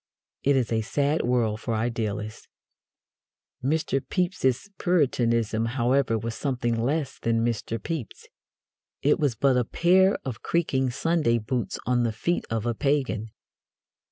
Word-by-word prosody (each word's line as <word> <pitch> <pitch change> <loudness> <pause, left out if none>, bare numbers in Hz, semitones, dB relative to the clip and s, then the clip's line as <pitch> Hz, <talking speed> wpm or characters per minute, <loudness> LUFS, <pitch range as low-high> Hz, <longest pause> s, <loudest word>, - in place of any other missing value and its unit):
It 140 0 +3
is 125 -4 0
a 110 -1 +2
sad 145 +7 0
world 120 -3 0
for 115 - -2
idealists. 110 -2 -3 1.2
Mr. 140 -1 +1
Pepys's 180 -3 0
Puritanism, 115 - +1
however, 125 -1 +2
was 115 +1 -4
something 120 -3 -1
less 135 +5 -1
than 115 0 +1
Mr. 115 -1 -2
Pepys. 125 0 -6 0.8
It 145 +2 +3
was 140 -6 +1
but 130 +3 +3
a 125 - +3
pair 185 - +3
of 125 -4 -5
creaking 135 -6 0
Sunday 150 -2 +1
boots 115 +2 -2
on 125 -1 +2
the 115 -1 +1
feet 170 +11 -1
of 115 0 -2
a 120 - +1
pagan. 130 -5 0
125 Hz, 135 wpm, -26 LUFS, 115-145 Hz, 1.2 s, It